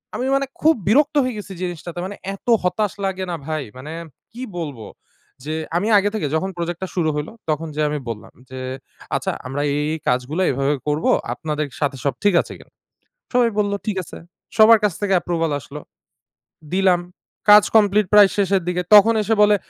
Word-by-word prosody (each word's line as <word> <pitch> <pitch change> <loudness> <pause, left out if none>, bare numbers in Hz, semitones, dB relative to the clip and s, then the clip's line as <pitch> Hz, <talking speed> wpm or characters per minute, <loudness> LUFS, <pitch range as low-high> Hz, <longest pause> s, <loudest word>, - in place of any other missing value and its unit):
আমি 255 - -2
মানে 275 0 +1 0.2
খুব 315 0 +5
বিরক্ত 290 +7 +3
হয়ে 255 -3 -2
গেছি 200 -1 -7
জিনিসটাতে। 175 0 -5
মানে 200 +1 -6 0.2
এত 200 - -21 0.2
হতাশ 205 +2 0
লাগে 190 -1 -2
না - - -2
ভাই! 155 -2 -2
মানে 145 +5 -8 0.4
কি 240 +3 -10 0.2
বলব? 145 -8 -5 0.6
যে 155 +1 -4 0.2
আমি 205 +5 -1
আগে 205 +1 +2
থেকে 175 -9 -1
যখন 190 +4 -1
প্রজেক্ট 170 0 -3
টা - - -2
শুরু 165 -3 +1
হইলো। 150 +5 -4 0.2
তখন 155 +1 -1
যেয়ে 150 -1 +1
আমি 150 -1 -2
বললাম 105 -2 -7 0.2
যে, 130 0 -8 0.6
"আচ্ছা, - - -1 0.2
আমরা 140 +2 -3
এই, 145 - 0
এই 160 - -4
কাজগুলো 130 +8 0
এভাবে 140 +2 0
করব। 150 +2 -1 0.3
আপনাদের 150 -2 -3
সাথে 140 -2 -1
সব 140 - +1
ঠিক 205 -2 +4
আছে - - -10
কিনা?" - - -19 0.6
সবাই 245 -2 +3
বললো, 205 -1 +1
"ঠিক 205 -3 -1
আছে।" - - -11 0.4
সবার 220 +1 +8
কাছ 205 - +2
থেকে 200 -2 +1
approval 165 -2 -1
আসলো। 145 +2 -10 0.9
দিলাম। 185 -2 +3 0.5
কাজ 210 0 +9
কমপ্লিট 210 -1 +4
প্রায় 205 -1 +8
শেষের 195 -2 +2
দিকে। 180 0 0
তখন 215 +2 +8
এসে 225 +2 +1
বলে, 210 0 +5
180 Hz, 185 wpm, -21 LUFS, 150-205 Hz, 0.9 s, কাজ